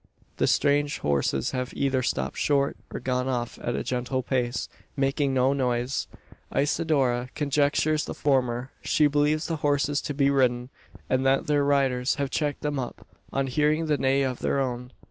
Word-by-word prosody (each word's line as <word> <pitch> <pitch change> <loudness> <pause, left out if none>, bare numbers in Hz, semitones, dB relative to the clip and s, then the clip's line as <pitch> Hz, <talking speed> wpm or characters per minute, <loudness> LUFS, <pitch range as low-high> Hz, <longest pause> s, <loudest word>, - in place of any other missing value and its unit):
The - - +2
strange 145 +1 +2
horses 70 -2 0
have 125 -1 -4
either 135 -2 +1
stopped 125 - -2
short, 140 -1 +2 0.2
or - - -4
gone 125 0 -1
off 120 -2 -2
at 120 - -2
a - - -2
gentle 125 +1 -2
pace, 125 -1 -1 0.3
making 135 +1 +1
no 130 +1 +3
noise! 125 -1 -1 0.4
Isidora 140 -5 +1
conjectures 150 +1 +1
the - - -6
former. 130 -2 0
She 150 - +2
believes 150 +2 +2
the 165 -2 -2
horses 145 -1 +1
to 145 - -4
be 140 0 +3
ridden; 125 -2 +1 0.4
and 130 0 +1
that 135 +1 +2
their 145 -1 +2
riders 135 -2 +2
have 140 -3 -2
checked 145 -1 -1
them 145 -2 -1
up, 125 - -6 0.3
on 135 0 0
hearing 150 +4 +1
the 150 -2 +1
neigh 135 +1 +2
of 130 -2 -2
her 140 - 0
own. 125 -1 -3
135 Hz, 170 wpm, -26 LUFS, 125-145 Hz, 0.4 s, no